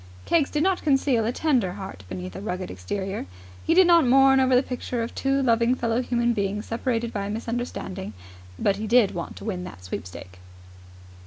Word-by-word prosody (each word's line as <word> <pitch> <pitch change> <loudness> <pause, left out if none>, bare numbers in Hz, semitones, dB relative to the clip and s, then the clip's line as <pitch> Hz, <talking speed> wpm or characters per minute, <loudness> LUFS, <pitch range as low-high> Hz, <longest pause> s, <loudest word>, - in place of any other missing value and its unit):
Keggs 320 -4 +2
did 300 0 0
not 380 0 +1
conceal 270 -6 +2
a 230 - +1
tender 250 - +1
heart 190 - -8
beneath 90 0 -6
a - - -6
rugged 185 -3 -4
exterior: 190 - -4 0.4
he 330 - +2
did 375 0 +7
not 340 -1 +6
mourn 270 +1 +5
over 260 -1 +3
the 250 - +4
picture 250 -2 -3
of 230 - -6
two 270 0 0
loving 235 0 +3
fellow 235 -1 0
human 240 -1 +1
beings 205 0 -2
separated 235 0 -2
by 200 -1 -3
a - - -5
misunderstanding; 220 - -4 0.4
but 195 - +1
he 215 +1 -4
did 230 -2 +4
want 170 -1 -5
to - - -10
win 185 -5 -3
that 180 - -10
sweepstake. 90 +1 -8
230 Hz, 190 wpm, -25 LUFS, 190-260 Hz, 0.4 s, did